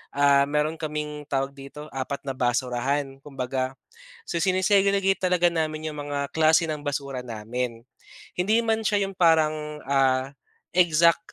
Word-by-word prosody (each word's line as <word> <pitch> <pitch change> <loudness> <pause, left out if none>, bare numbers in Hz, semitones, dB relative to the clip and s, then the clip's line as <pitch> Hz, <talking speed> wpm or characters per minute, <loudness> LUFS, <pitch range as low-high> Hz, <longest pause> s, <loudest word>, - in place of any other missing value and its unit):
ah, 140 -1 +4
meron 150 +1 +1
kaming 150 -1 -4
tawag 135 0 -1
dito, 140 +2 -10
apat 135 +1 -4
na 135 - -2
basurahan 130 +2 -1
kumbaga. 130 -1 -3 0.5
So, 170 - -2
sine-segregate 195 +1 +3
talaga 180 -1 +3
namin 155 -1 -2
yung 150 - -7
mga 140 -1 -3
klase 160 +1 +4
ng 150 -1 -3
basura 140 -2 -3
namin, 115 +1 -4 0.6
hindi 205 +5 +3
man 225 -1 0
siya 205 -2 +2
yung 195 - -9
parang, 155 -3 +2
ah, 135 -1 +2 0.5
exact 170 -1 +3
150 Hz, 140 wpm, -25 LUFS, 135-170 Hz, 0.6 s, ah